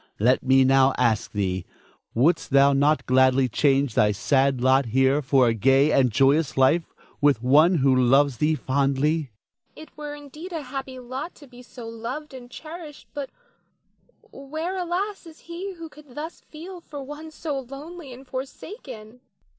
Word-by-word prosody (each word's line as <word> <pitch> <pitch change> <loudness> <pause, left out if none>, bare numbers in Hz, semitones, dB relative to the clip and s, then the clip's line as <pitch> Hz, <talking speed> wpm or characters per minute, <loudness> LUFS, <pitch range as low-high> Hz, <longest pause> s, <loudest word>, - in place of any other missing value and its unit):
Let 125 +5 +3
me 135 0 +4
now 135 0 +4
ask 115 -4 +1
thee, 95 -3 -2 0.5
Wouldst 160 +8 +2
thou 140 +1 +5
not 145 +3 +2
gladly 130 0 +3
change 135 0 +1
thy 105 -1 +3
sad 135 +5 +1
lot 130 +1 +3
here 130 +5 +2
for 135 -2 +3
a 115 - +2
gay 135 +6 +3
and 130 -3 +3
joyous 135 +3 +2
life 145 +6 +3 0.3
with 140 -5 +3
one 155 +8 +5
who 135 -4 +3
loves 130 +1 +3
thee 155 +4 +1
fondly? 140 +2 +1
Nina. 145 -4 -7 0.5
It - - -18
were 295 -1 -7
indeed 300 +5 -10
a 320 -3 -4
happy 265 0 -6
lot 255 +6 -7
to 295 - -15
be 250 -2 -15
so 245 -1 -11
loved 240 +7 -7
and 250 -2 -11
cherished; 310 +2 -10
but 285 -2 -5 1.0
where, 315 +7 -5
alas, 370 +2 -3
is 320 -1 -15
he 355 +4 -7
who 330 -2 -9
could 295 -4 -17
thus 315 +3 -7
feel 345 +3 -10
for 290 -4 -9
one 295 +3 -9
so 305 -2 -4
lonely 280 +4 -10
and 255 +2 -12
forsaken? 255 - -8
175 Hz, 165 wpm, -24 LUFS, -, 1.0 s, thou